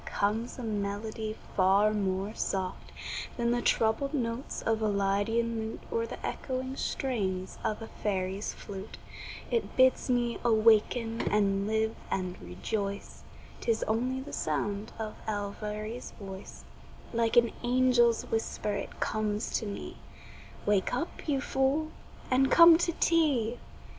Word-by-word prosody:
comes 220 +4 -1
a 250 - -6
melody 215 +1 -3 0.2
far 200 +3 +4
more 195 0 -1
soft 190 -4 -3 0.5
Than 235 -1 +1
the 240 0 +1
troubled 235 +7 +2
notes 235 0 -3
of 225 0 +1
a 215 - +2
lydian 205 +3 +1
lute 220 0 -5
Or 460 0 0
the - - -7
echoing 260 0 -3
strains 195 -11 -2
of 215 +1 -1
a - - -7
fairy's 195 -1 -2
flute; 195 0 -8 0.5
It 470 -2 -1
bids 260 0 +4
me 240 -1 +1
awaken 225 0 +3
and 200 -1 +2
live 220 +1 +1
and 185 -1 -2
rejoice, 200 - -4 0.4
'Tis 225 -1 0
only 250 +4 0
the 275 - -9
sound 200 +8 -2
of 220 -1 -4
Elviry's 210 +2 -4
voice 195 -1 -9 0.5
Like 230 0 +2
an 235 -1 +6
angel's 245 -1 +4
whisper 225 -2 -2
it - - -5
comes 215 0 -1
to 220 - -5
me: 200 - -6 0.7
"Wake 205 -2 +2
up, 330 - -4
you 280 -3 +2
fool, 280 +4 +1 0.4
and 265 +1 +4
come 335 +1 +9
to 340 - +2
tea." 280 -10 +2
220 Hz, 135 wpm, -30 LUFS, 205-245 Hz, 0.7 s, come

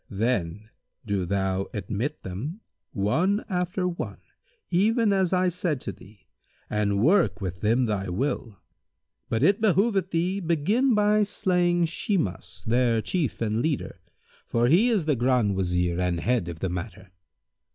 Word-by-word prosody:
Then 105 -2 -2 0.3
do 100 -4 -1
thou 95 0 -1
admit 110 +8 -3
them, 135 - -6 0.3
one 160 - +1
after 180 -1 -1
one, 175 -1 -4 0.5
even 215 +4 +3
as 190 -3 +1
I 185 0 +2
said 170 -5 -2
to - - -4
thee 100 +1 -17 0.5
and 100 -1 +1
work 125 - +3
with 90 -1 -5
them 115 +4 +2
thy 100 -4 -2
will; 115 +1 -2 0.7
but 115 +3 0
it 200 +7 +3
behoveth 195 -2 +2
thee 180 +3 0
begin 200 - +2
by 210 0 +3
slaying 180 -4 +1
Shimas, 165 - -3
their 120 0 +2
chief 160 - -2
and 110 0 0
leader; 150 0 -2 0.5
for 115 0 +1
he 195 - +5
is 210 -9 +1
the 150 -2 +2
Grand 120 -4 +2
Wazir 90 -2 0
and 90 -1 0
head 120 -3 0
of 85 -2 -7
the 95 - -1
matter. 95 +1 -6
125 Hz, 145 wpm, -26 LUFS, -, 0.7 s, he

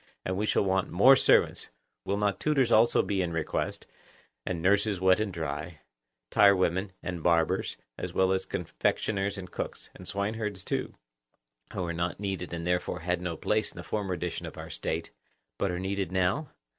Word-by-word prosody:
And 95 - -1
we 105 +3 -1
shall - - +3
want 95 -1 +1
more 125 +10 +7
servants. - - +3 0.4
Will 100 - 0
not 105 -1 0
tutors 140 -5 +2
be - - +3
also 115 +2 +4
in 95 -4 0
request, 80 -1 -2 0.6
and 90 -3 -1
nurses 100 +2 +2
wet 95 +1 +4
and 110 -2 -1
dry, 80 -1 -5 0.5
tirewomen 95 -1 +4
and 90 -1 -4
barbers, 85 0 +2 0.2
as - - -4
well 95 0 +2
as 95 0 0
confectioners 100 -1 -1
and 90 -2 -8
cooks; - - -5
and - - -12
swineherds, 105 -1 -2
too, - - -2 0.8
who 95 - -3
were 85 -1 -2
not 85 +2 -2
needed 100 -2 -3
and 85 0 -4
therefore 90 -2 -1
had 90 +1 -1
no 85 -3 -3
place 110 +5 0
in - - -19
the - - -6
former 100 -4 -2
edition 85 0 -4
of - - -10
our - - -7
State, - - -3 0.5
but 100 - +1
are 90 - -2
needed 95 0 -2
now? 95 - +1
95 Hz, 180 wpm, -29 LUFS, 90-100 Hz, 0.8 s, more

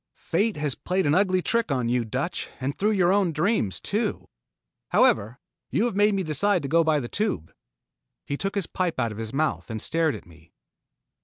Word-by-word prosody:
"Fate 220 0 0
has 145 -2 0
played 185 +6 -1
an 145 - +3
ugly 185 0 +2
trick 230 -8 +1
on 125 -3 0
you, 120 0 +1
Dutch, 130 +10 -3
and 135 +2 -2
through 210 - +1
your 190 -4 +3
own 195 -4 +2
dreams 160 - 0
too. - - -2 0.6
However, 110 +6 +3 0.3
you 220 - +1
have 240 - -2
made 205 0 +4
me 190 - 0
decide 170 +4 +2
to - - -2
go 165 +4 +4
by 155 -2 +2
the 120 - -4
Tube." 200 - -2 0.7
He 140 - -2
took 195 +7 -3
his 200 -4 0
pipe 175 -5 -2
out 115 -3 0
of 105 - -8
his 110 -1 -4
mouth 155 0 -1
and 110 -1 -4
stared 160 +4 0
at - - -10
me. 85 -1 -19
160 Hz, 205 wpm, -25 LUFS, 125-195 Hz, 0.7 s, made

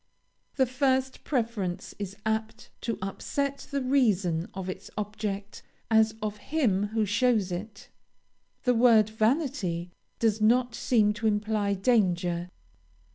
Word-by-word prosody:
The 265 - +4
first 260 0 0
preference 225 -9 -2
is 200 -1 -5
apt 220 0 -2
to 230 - -2
upset 280 +8 -3
the 280 -2 -1
reason 200 -11 +2
of 190 -1 -5
its 185 - -6
object 210 -1 -4 0.3
as 220 0 +4
of 210 -1 -2
him 210 -8 0
who 220 0 0
shows 210 -2 +2
it. 200 +4 -6 0.8
The 250 - +3
word 225 -3 +5
vanity 215 - 0 0.3
does 220 -1 +1
not 240 +2 +3
seem 220 -3 +2
to 215 +2 -1
imply 210 -1 0
danger. 180 -5 +1
215 Hz, 125 wpm, -28 LUFS, 200-245 Hz, 0.8 s, word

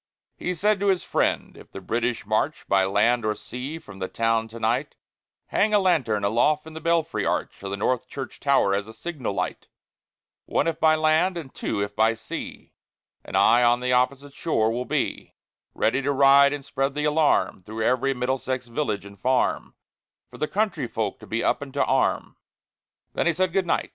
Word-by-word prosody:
He 180 - -3
said 205 +4 +2
to 200 - 0
his 190 -2 +2
friend, - - -1
"If - - -15
the - - -7
British 120 +5 -2
march 110 +9 -1
By 95 -1 +3
land 115 +5 +2
or 105 0 0
sea 130 +6 -6
from 100 -11 -13
the 95 - -2
town 115 0 0
to 115 +1 -10
night, 120 +6 -1 0.5
Hang 215 +1 +2
a - - +7
lantern 135 - +1
aloft 120 +9 +2
in 160 - -10
the 160 - -8
belfry 165 0 0
arch - - -2
Of 100 - -5
the 100 - -3
North 125 +4 0
Church 135 -1 -7
tower 135 -8 +3
as 100 +1 -1
a 110 - -11
signal 145 -8 -4
light, - - -3 0.8
One, - - +1
if 165 -1 -1
by 160 -1 +5
land, 155 +4 +2
and 150 -6 -8
two, 100 - -2
if 100 0 -6
by 110 +1 +3
sea; 110 - -8 0.5
And - - -3
I 120 +2 +5
on 120 0 +4
the 125 0 0
opposite 135 +3 0
shore 110 -10 0
will 125 +2 -3
be, - - -2 0.4
Ready 125 +5 +1
to 140 +1 0
ride 140 0 +6
and 145 -2 -5
spread 135 0 -2
the 150 0 -1
alarm 150 -9 +2
Through 110 +4 -5
every 130 +3 +1
Middlesex 130 0 -2
village 115 -5 -3
and 100 -1 -13
farm, 130 +4 0 0.6
For - - -12
the 155 - 0
country 210 +4 -1
folk - - -3
to - - -13
be - - -2
up - - +1
and - - -7
to - - +2
arm." - - 0 0.8
Then - - 0
he 170 - +3
said, 185 +1 0
"Good 190 -2 +1
night!" - - 0
130 Hz, 200 wpm, -24 LUFS, 115-155 Hz, 0.8 s, a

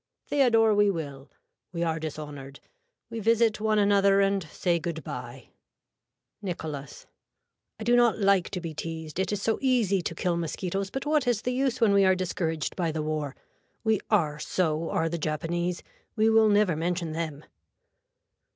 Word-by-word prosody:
Theodore 230 -6 +4
we 205 0 +4
will. 145 -6 -5 0.4
We 170 -2 -2
are 160 -1 -1
dishonored. 145 -3 -7 0.5
We 230 - -4
visit 225 0 +2
one 215 0 +2
another 200 -1 +4
and 195 0 +2
say 170 +1 -1
good 160 -2 -4
bye. 125 0 -8 0.9
(Nicholas.) 155 -7 -6 0.7
I - - -5
do 240 +2 +3
not 240 -2 +4
like 195 -3 +3
to 185 - -4
be 165 -2 -6
teased. 160 +1 -6
It 190 0 0
is 205 -1 -2
so 225 - +1
easy 235 -8 +2
to 165 - -4
kill 175 +1 0
mosquitoes 185 +4 -3
but 270 +5 -5
what 295 -3 +1
is 235 -3 +1
the 250 - -1
use 265 -1 0
when 215 -3 +4
we 200 0 +5
are 190 -1 +5
discouraged 165 -4 -2
by 170 -3 0
the 155 0 -3
war. 150 -3 -3 0.5
We 220 -3 +2
are 155 -8 +1
so 160 0 -1
are 165 - 0
the 170 +1 -3
Japanese. 170 +3 -2 0.3
We 220 0 +3
will 220 -1 +5
never 205 -5 +3
mention 170 +1 -2
them. 155 -2 -4
180 Hz, 170 wpm, -27 LUFS, 160-215 Hz, 0.9 s, we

